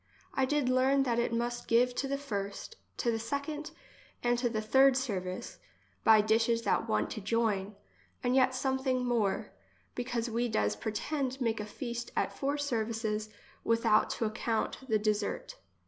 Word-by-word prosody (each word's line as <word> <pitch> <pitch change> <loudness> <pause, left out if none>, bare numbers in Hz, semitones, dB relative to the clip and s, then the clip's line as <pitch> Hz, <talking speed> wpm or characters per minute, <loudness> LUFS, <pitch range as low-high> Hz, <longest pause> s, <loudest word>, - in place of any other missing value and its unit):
I 265 - +2
did 290 -1 +1
learn 260 +2 +3
that 240 -3 +1
it 235 - 0
must 240 +1 -2
give 245 +2 +4
to 275 - -2
the 275 +1 -1
first, 205 - -5 0.2
to 230 -2 0
second, 285 +6 -3 0.5
and 240 0 +3
to 245 -1 +1
the 220 -2 -1
third 265 +4 +5
service, 185 -8 -3 0.4
by 220 -1 +7
dishes 225 +2 +2
that - - +1
want 105 0 +1
to 215 - -5
join, 210 -2 0 0.5
and 250 0 +2
yet 260 -1 +4
some 265 0 0
thing 255 -1 0
more; 225 -5 0 0.4
because 245 -1 -2
we 235 +1 0
does 105 - +1
pretend 260 - -2
make 230 -3 0
a 210 - -4
feast 235 +2 -5
at - - 0
four 285 +1 -1
services 225 -5 -1 0.3
without 230 -2 +3
to 230 - 0
ac 215 - -1
count 225 -2 -1
the 220 - +4
dessert. 210 -1 -1
235 Hz, 165 wpm, -31 LUFS, 215-260 Hz, 0.5 s, by